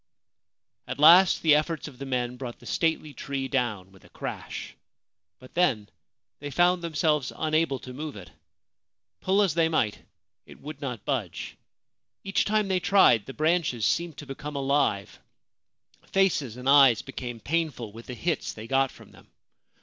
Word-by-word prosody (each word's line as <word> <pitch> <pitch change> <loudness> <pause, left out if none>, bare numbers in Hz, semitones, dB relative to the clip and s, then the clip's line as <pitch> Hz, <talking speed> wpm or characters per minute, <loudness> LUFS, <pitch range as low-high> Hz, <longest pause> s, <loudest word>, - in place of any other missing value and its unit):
At - - -5
last 170 +5 +7
the 155 -2 +6
efforts 155 +2 0
of 130 -4 -13
the 140 - -6
men 125 -1 -2
brought 125 -2 -7
the - - -18
stately 160 -3 -1
tree 135 -1 -4
down 115 -9 -2
with 95 - -20
a - - -18
crash; - - -7 0.6
but 130 - -16
then 130 -13 +1 0.5
they 145 - -6
found 175 +5 +2
themselves 155 -4 0
unable 155 -2 0
to 125 0 -10
move 150 +2 -6
it. 90 -6 -11 0.9
Pull 195 +2 +2
as 190 -7 +1
they 165 0 +2
might, 115 -10 0 0.5
it - - -14
would 150 0 -9
not 125 -7 -5
budge. 120 - -3 0.7
Each 195 - 0
time 215 0 +1
they 190 -1 +1
tried 180 - +4
the 135 - -7
branches 155 -8 +1
seemed 170 +2 0
to 145 - -8
become 140 +2 -7
alive; 135 -8 0 0.9
faces 160 - +1
and 125 +1 -6
eyes 135 -5 +6
became 125 -3 -7
painful 145 -6 -2
with 115 +2 -12
the 125 - -6
hits 165 +4 -2
they 110 - -9
got 135 +2 +2
from - - -16
them. - - -19
140 Hz, 165 wpm, -26 LUFS, 125-165 Hz, 0.9 s, last